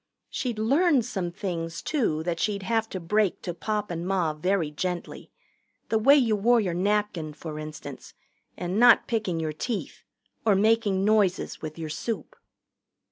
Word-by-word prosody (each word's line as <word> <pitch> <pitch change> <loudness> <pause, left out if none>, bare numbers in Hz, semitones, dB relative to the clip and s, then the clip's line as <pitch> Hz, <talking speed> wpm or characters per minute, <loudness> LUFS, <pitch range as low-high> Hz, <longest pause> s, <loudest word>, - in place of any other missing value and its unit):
She'd 245 -4 -2
learned 275 +4 +3
some 190 -7 -3
things, 165 -3 -4
too, 215 - 0
that 170 0 -2
she'd 200 -1 -1
have 225 +1 0
to 185 - -4
break 200 +3 0
to 175 - -3
Pop 210 +3 -3
and 170 +1 -4
Ma 180 -5 +1
very 165 0 0
gently 175 +3 -4 0.6
the 220 - +2
way 275 +6 +7
you 235 -7 +3
wore 235 +4 +4
your 190 -6 -1
napkin, 190 -4 0
for 155 -1 -7
instance, 155 0 -9 0.4
and 180 +3 -2
not 240 0 +7
picking 210 -8 -1
your 155 -1 -2
teeth, 215 - -4 0.4
or 215 -3 +4
making 205 -2 +2
noises 205 -4 +1
with 155 0 -6
your 160 -1 -5
soup. 225 - -4
195 Hz, 160 wpm, -26 LUFS, 170-220 Hz, 0.6 s, way